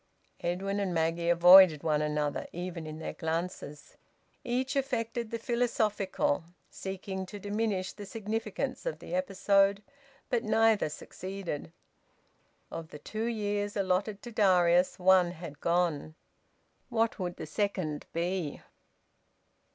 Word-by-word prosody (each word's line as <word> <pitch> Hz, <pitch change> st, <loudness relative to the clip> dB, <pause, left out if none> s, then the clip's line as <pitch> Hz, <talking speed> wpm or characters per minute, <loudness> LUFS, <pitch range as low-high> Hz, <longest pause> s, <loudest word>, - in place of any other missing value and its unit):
Edwin 195 Hz, +3 st, -2 dB
and 190 Hz, -3 st, -1 dB
Maggie 165 Hz, +1 st, +1 dB
avoided 175 Hz, -2 st, +8 dB
one 155 Hz, -2 st, +2 dB
another, 150 Hz, -1 st, -1 dB
even 175 Hz, -2 st, -5 dB
in 155 Hz, 0 st, -6 dB
their 160 Hz, -, -5 dB
glances. 160 Hz, -2 st, -4 dB, 0.5 s
Each 255 Hz, +3 st, -1 dB
affected 240 Hz, -4 st, -1 dB
the 230 Hz, -, -3 dB
philosophical, 220 Hz, -, 0 dB, 0.3 s
seeking 190 Hz, 0 st, -5 dB
to 205 Hz, -, -8 dB
diminish 205 Hz, -2 st, -2 dB
the 205 Hz, -2 st, -9 dB
significance 225 Hz, -, -3 dB
of -, -, -2 dB
the -, -, -9 dB
episode. 200 Hz, -6 st, +2 dB, 0.4 s
But 240 Hz, -2 st, 0 dB
neither 220 Hz, -4 st, +3 dB
succeeded. 185 Hz, -, -6 dB, 1.0 s
Of 165 Hz, -1 st, -6 dB
the 150 Hz, -, -10 dB
two 215 Hz, +9 st, -4 dB
years 205 Hz, -2 st, -2 dB
allotted 195 Hz, +2 st, 0 dB
to 240 Hz, -, -7 dB
Darius, 180 Hz, -4 st, +4 dB
one 180 Hz, -1 st, +4 dB
had 160 Hz, -4 st, -9 dB
gone. 170 Hz, -3 st, 0 dB, 0.7 s
What 230 Hz, -2 st, 0 dB
would 180 Hz, -2 st, -3 dB
the -, -, -6 dB
second 185 Hz, -8 st, -2 dB
be? 170 Hz, -2 st, -2 dB
190 Hz, 120 wpm, -30 LUFS, 170-215 Hz, 1.0 s, avoided